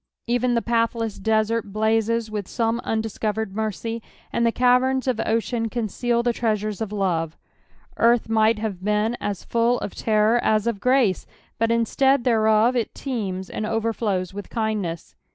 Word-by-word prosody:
Even 245 0 +1
the 235 - +1
pathless 230 -2 0
desert 220 +2 +1
Mnzes 220 +1 +1
with 205 -3 -4
soroe 230 0 0
undiscovered 220 -2 -2
mercy, 220 +2 -3 0.3
and 235 - +1
the - - +3
caverna 255 +2 +3
of 250 -3 0
ocean 230 +1 0
conceal 235 +1 -1
tile 240 -1 +1
treasures 215 -3 -1
of 215 -2 -3
lore. 180 -6 0 0.7
Garth 235 0 +3
nuglit 220 0 +3
have 205 -4 -4
been 210 +3 +1
as 205 -2 -3
full 235 +1 +1
of - - -4
terror 220 +2 +2
as 215 -1 +2
of 230 -4 -1
grace, 250 -4 +2 0.3
but 230 0 +2
instead 240 +3 +2
(hereof 220 0 +3
it 235 -3 -1
teems 195 -8 -4
and 215 - -5
overflows 220 -4 -1
with 205 0 -7
kindness. 210 -7 -3
225 Hz, 150 wpm, -23 LUFS, 210-235 Hz, 0.7 s, the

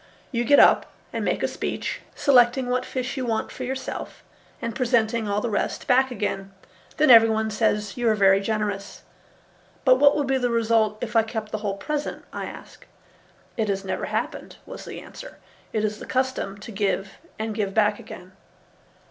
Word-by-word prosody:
You 240 -2 -1
get 285 +4 +6
up - - +6 0.3
and - - -2
make - - -1
a - - +3
speech, - - -4
selecting 250 -1 +4
what 250 0 0
fish 255 +1 -4
you 260 - -2
want 225 -3 -2
for 255 - -7
yourself 265 +1 -5 0.4
and 230 -2 -4
presenting 235 -3 +1
all 205 +1 0
the 240 - -2
rest 205 - -2
back 260 0 +4
again. 195 -5 -3 0.5
Then 305 -3 +5
everybody 220 -1 +6
says 210 -1 0
you 240 -2 +2
are 215 - +3
very 195 -1 +5
generous." 205 -1 -3 0.8
"But 255 -1 +6
what 285 0 +6
would 290 - 0
be 265 0 +1
the 245 -1 0
result 225 -2 +2
if 235 -2 -5
I 225 - +7
kept 220 -1 -5
the 215 - -3
whole 200 -2 -3
present?" 295 +6 -4
I - - -4
asked. - - -12 0.7
"It 220 -2 0
has 195 0 -2
never 185 -1 -2
happened," - - -4
was - - -9
the - - -7
answer. - - -11 0.3
"It 215 -1 0
is 210 0 -3
the - - -9
custom 260 -6 -1
to 210 +2 -10
give 195 -1 -2 0.2
and 220 0 -3
give 205 -3 -2
back 210 -1 +3
again." 180 +1 -11
225 Hz, 185 wpm, -24 LUFS, 210-250 Hz, 0.8 s, I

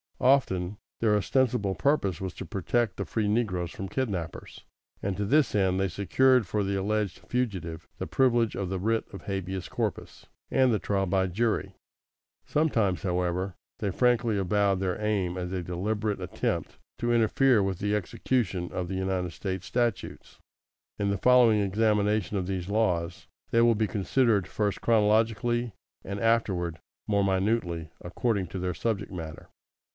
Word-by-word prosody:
Often 105 -8 +2 0.2
their 110 -2 +3
ostensible 105 0 +1
purpose 95 - +1
was 95 -1 -4
to - - -7
protect 100 +4 -1
the - - -3
free 110 -2 -1
negroes 100 -6 0
from 95 - -6
kidnappers, 95 - -4 0.4
and 95 -1 -2
to 105 - -1
this 145 +6 +3
end 95 -2 +2
they 95 - +2
secured 115 +7 +3
for 105 +3 -1
the 100 0 -1
alleged 100 0 -1
fugitive 95 -10 -3
the - - -4
privilege 120 -4 +2
of 95 -2 -3
the 95 0 -2
writ 115 +4 +1
of 95 - -8
habeas 95 -2 -4
corpus, - - -4 0.2
and 130 -2 +4
the 110 - +1
trial 95 0 0
by 95 +1 +2
jury. 110 +5 -1 0.7
Sometimes, 115 - +1
however, 90 0 -1 0.2
they 100 - -2
frankly 120 0 +2
avowed 100 0 +2
their 95 0 -1
aim 100 -4 0
as 90 0 -4
a 95 -2 -2
deliberate 105 +4 -2
attempt - - -3 0.2
to 120 0 0
interfere 120 +1 +4
with 95 -2 -1
the 105 +2 0
execution 95 -2 -1
of 90 - -3
the 95 - -4
United 95 -2 -1
States 95 -2 -4
statutes. 120 -5 -2 0.6
In 100 -1 +1
the 100 - 0
following 120 -1 +5
examination 105 0 +1
of 95 - -1
these 95 -1 -3
laws, 90 -5 0 0.2
they 115 - +4
will 115 -1 +5
be 110 0 +1
considered 105 +1 +1
first 105 -2 -1
chronologically, 115 +1 +2 0.3
and 100 +1 -5
afterward 95 -8 +1 0.3
more 100 -1 +2
minutely 95 -4 0
according 100 +2 -1
to 95 - -6
their 90 0 -1
subject 110 -3 -2
matter. 80 -4 -7
100 Hz, 155 wpm, -28 LUFS, 95-115 Hz, 0.7 s, following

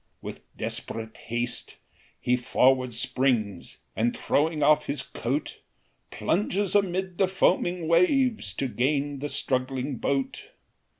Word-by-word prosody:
With - - -7 0.2
desperate 110 0 -4
haste 120 +1 -3 0.4
he 125 - +2
forward 130 +1 +2
springs, 115 -3 0 0.2
And 120 +2 0
throwing 155 +1 +1
off 150 +1 +4
his 140 -1 -1
coat, 135 +6 -3 0.5
Plunges 195 +1 0
amid 190 -2 0
the 190 - +4
foaming 180 -2 +1
waves, 180 - +3
To 135 - -1
gain 140 +5 0
the 145 +2 -3
struggling 130 0 -1
boat. 135 +3 -2
140 Hz, 115 wpm, -27 LUFS, 125-175 Hz, 0.5 s, off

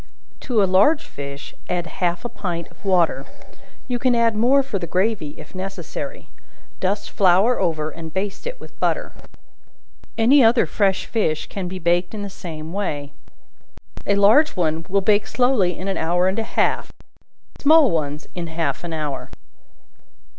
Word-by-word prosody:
To 225 -5 +1
a - - +5
large 200 - +4
fish 140 0 -8 0.2
add 175 -1 -1
half 175 +5 -2
a - - -2
pint 175 -6 -4
of - - -23
water; 170 -8 +2 0.6
you 245 -1 -2
can 250 -1 +2
add 230 -1 +2
more 255 +6 +4
for 215 -7 -3
the 170 - -5
gravy 185 -4 -1
if 155 - -12
necessary; 195 - -6 0.5
dust 200 +2 -1
flour 195 +6 +4
over 155 -4 -1
and 160 -1 -8
baste 195 - -4
it - - -6
with - - -14
butter. - - 0 1.1
Any 255 +5 +6
other 230 +1 +5
fresh 195 -2 +1
fish 160 -9 -1
can 190 -3 -4
be 185 +1 -5
baked 175 +3 +1
in 205 - -4
the 200 - -6
same 160 -3 -7
way. 145 -8 -3 1.0
A 200 - +3
large 220 +10 +5
one 165 -2 -1
will 200 +1 +2
bake 205 +1 +2
slowly 245 -9 +2
in 185 - -5
an 195 - -1
hour 175 +2 +1
and 190 +4 0
a 225 - -5
half, - - +1 0.7
small 305 -3 +6
ones 150 -2 -2
in 175 -1 -4
half 165 +1 -2
an 170 -1 -5
hour. 150 -3 -4
190 Hz, 165 wpm, -22 LUFS, 170-225 Hz, 1.1 s, Any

